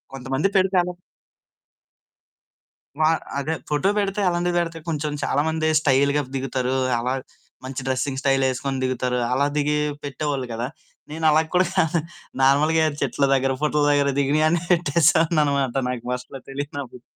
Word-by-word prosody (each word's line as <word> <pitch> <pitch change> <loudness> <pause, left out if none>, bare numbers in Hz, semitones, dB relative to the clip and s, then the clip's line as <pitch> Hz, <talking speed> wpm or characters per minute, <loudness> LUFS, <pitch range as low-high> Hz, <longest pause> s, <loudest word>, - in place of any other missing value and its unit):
కొంతమంది 135 +6 -1
పెడితే 190 0 +2
అలా 180 0 -4 2.1
వా 155 - +5 0.3
అదే 155 +3 -1
ఫోటో 150 +6 +1
బెడితే 200 0 -1
అలాంటివి 175 0 0
బెడితే 165 -1 -2
కొంచెం 150 -1 -2
చాలామంది 160 +2 0
స్టయిల్‌గా 140 0 +3
దిగుతారు. 130 -1 -1 0.2
అలా 125 +2 -1 0.5
మంచి 130 0 -5
డ్రెస్సింగ్ 130 +1 -1
స్టయిలేసుకొని 135 -1 0
దిగుతారు. 125 -1 -1
అలా 140 +2 +2
దిగి 150 0 +1 0.3
పెట్టేవాళ్ళు 140 -1 -3
గదా! 120 +3 -3 0.4
నేనలా 155 0 +3
కూడా 180 0 +4
కాదు 165 -2 +2 0.4
నార్మల్‌‌గా 155 +4 +4 0.2
చెట్ల 140 +1 0
దగ్గర, 135 0 +1
పుట్టల 150 0 +1
దగ్గర 140 -1 +3
దిగినయన్ని 155 +4 +2
పెట్టేసేవాడినన్నమాట 150 -5 +2
నాకు 120 -2 -4
ఫస్ట్‌లో 125 +1 -6
తెలియనప్పుడు. 140 -3 -6
145 Hz, 120 wpm, -23 LUFS, 135-160 Hz, 2.1 s, వా